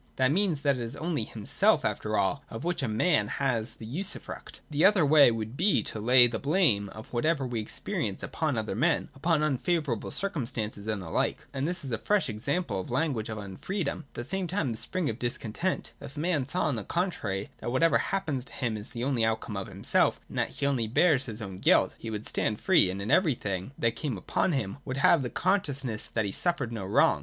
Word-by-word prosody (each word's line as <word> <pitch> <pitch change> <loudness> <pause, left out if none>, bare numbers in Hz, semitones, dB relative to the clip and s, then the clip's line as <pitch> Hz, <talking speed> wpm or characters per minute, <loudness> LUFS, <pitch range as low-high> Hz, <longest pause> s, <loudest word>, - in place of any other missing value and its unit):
That 130 0 +3
means 175 -4 +1
that 140 -2 +2
it - - -4
is 115 +3 -4
only 155 -6 -1
himself 105 -2 +2
after - - -1
all - - 0
of 115 - -7
which 175 -1 -1
a 135 - 0
man 110 0 +2
has 120 -3 -1
the 110 - -10
usufruct. 170 - -4
The 150 +1 +1
other 195 -5 +6
way 145 -1 +7
would 115 +1 -3
be 185 +7 +3
to 110 - -4
lay 125 +3 +7
the 115 -2 -1
blame 140 - +2
of 110 +4 -11
whatever 140 +3 +1
we 120 -2 -2
experience 105 - -3
upon - - -1
other - - -2
men, - - +1
upon 155 +2 +1
unfavourable 150 -3 0
circumstances, 115 - -3
and 105 -3 -2
the 80 - -8
like. - - 0
And 140 +2 -1
this 175 -3 -2
is 130 - -4
a 115 - -1
fresh 205 -8 +1
example 110 - -1
of 95 - -5
the - - -6
language 130 -6 0
of 110 - -4
unfreedom, 140 - -3
and - - -9
at - - -35
the 120 - -4
same 190 +5 -1
time 165 -7 -1
the 110 - -4
spring 185 -4 -1
of 115 +1 -3
discontent. 120 - -2
If 135 - -10
man 155 -4 0
saw, 180 +5 -1
on 135 - 0
the 110 - -4
contrary, 135 - -2
that - - -4
whatever 165 +6 +3
happens 160 -10 -1
to - - -10
him 120 -4 -2
is 105 +3 -6
only 125 +1 0
the - - +4
outcome 110 -1 -2
of 95 -1 -4
himself, - - +2
and - - -4
that - - +1
he 140 - -4
only 130 -5 +1
bears 135 +3 +3
his 110 -2 -5
own 95 -2 -7
guilt, - - +4
he 115 - -6
would 105 -1 -5
stand 105 -1 -1
free, 170 - +4
and 95 +2 -4
in 105 - -2
every 165 -8 +4
thing 95 0 -4
that 115 -1 +1
came 135 -9 -3
upon 165 - 0
him 110 -5 -2
would 130 -1 -4
have 145 +2 +5
the 125 - -3
consciousness 140 - -1
that 110 -2 +1
he 100 - -2
suffered 160 - -1
no 105 -5 -4
wrong. 95 - +4
130 Hz, 230 wpm, -28 LUFS, 110-160 Hz, -, way